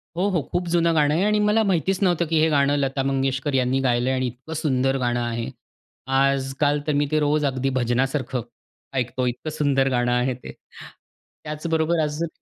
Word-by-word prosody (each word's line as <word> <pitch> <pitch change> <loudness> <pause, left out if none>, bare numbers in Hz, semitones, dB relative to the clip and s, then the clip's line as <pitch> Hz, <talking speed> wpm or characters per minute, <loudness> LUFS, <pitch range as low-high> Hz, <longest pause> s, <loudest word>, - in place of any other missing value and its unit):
हो, 185 +3 +1
हो, 175 -5 0
खूप 175 0 -1
जुनं 170 -1 +2
गाणं 150 -1 +3
आहे 175 +5 +1
आणि 210 0 +2
मला 210 +2 +3
माहितीच 190 -1 0
नव्हतं 175 -2 +2
की 160 -1 +2
हे 160 +1 +3
गाणं 145 -1 +2
लता 135 -1 -1
मंगेशकर 135 0 -1
यांनी 130 0 +1
गायलंय 125 0 +1
आणि 130 -1 0
इतकं 125 +7 -8
सुंदर 135 -4 +1
गाणं 120 -2 0
आहे. 120 +1 -3 0.6
आजकाल 135 +2 +1
तर 150 - +1
मी 145 - +2
ते 155 - +2
रोज 150 0 +1
अगदी 135 0 0
भजनासारखं 130 +1 0 0.5
ऐकतो. 125 0 -1
इतकं 125 +6 -4
सुंदर 140 -3 +1
गाणं 120 -1 +1
आहे 125 +1 +1
ते. 125 - -10 0.9
त्याचबरोबर 160 +2 -1
अजून 150 +3 -2
140 Hz, 180 wpm, -23 LUFS, 130-160 Hz, 0.9 s, गाणं